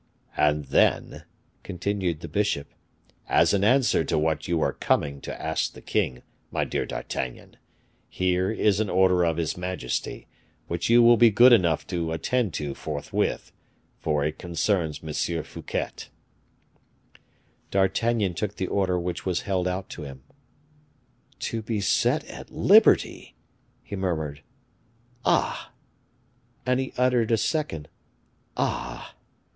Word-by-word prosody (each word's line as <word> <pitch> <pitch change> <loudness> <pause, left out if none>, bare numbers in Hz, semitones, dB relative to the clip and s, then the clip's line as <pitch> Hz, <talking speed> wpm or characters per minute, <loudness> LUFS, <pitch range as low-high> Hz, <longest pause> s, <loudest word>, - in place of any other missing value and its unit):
"And 75 0 +2
then," - - +1 0.4
continued 90 -3 -2
the - - -6
bishop, 100 -9 -1 0.6
"as - - +4
an 100 -1 +2
answer 130 +4 +3
to - - 0
what 75 0 0
you 85 - +1
were 80 - +1
coming 70 -1 0
to - - -7
ask - - -1
the - - -12
king, 60 -2 -1 0.3
my - - -1
dear - - -2
D'Artagnan, 65 -1 -5 0.5
here 90 0 0
is 105 -2 +2
an 110 -2 0
order 90 -1 +4
of 85 -1 +1
his 80 -2 -1
majesty, 90 -7 -4 0.4
which 85 +2 -2
you 120 +1 +7
will 120 0 +7
be 120 0 +7
good 120 +4 +7
enough 85 -8 +3
to 85 -3 -2
attend 115 +5 0
to 75 -2 -3
forthwith, 75 0 -3 0.5
for 75 -2 0
it 75 +1 -3
concerns 85 -3 -1
M. 80 +1 -2
Fouquet." - - -4 1.8
D'Artagnan 100 +1 +1
took 105 +3 -3
the 95 - -2
order 95 -1 0
which 90 0 -4
was 90 -2 -1
held 95 -2 -1
out 90 +1 -3
to - - -8
him. 70 -3 -9 1.2
"To 115 - -2
be 110 -1 -2
set 100 - +1
at - - -10
liberty!" - - +4 0.5
he - - -6
murmured. 80 -6 -2 0.8
"Ah!" - - +1 0.9
and 125 0 +2
he 130 - -3
uttered 125 -3 +2
a 115 - +3
second 125 - -2 0.7
"ah!" 60 -1 -3
90 Hz, 135 wpm, -26 LUFS, 80-105 Hz, 1.8 s, you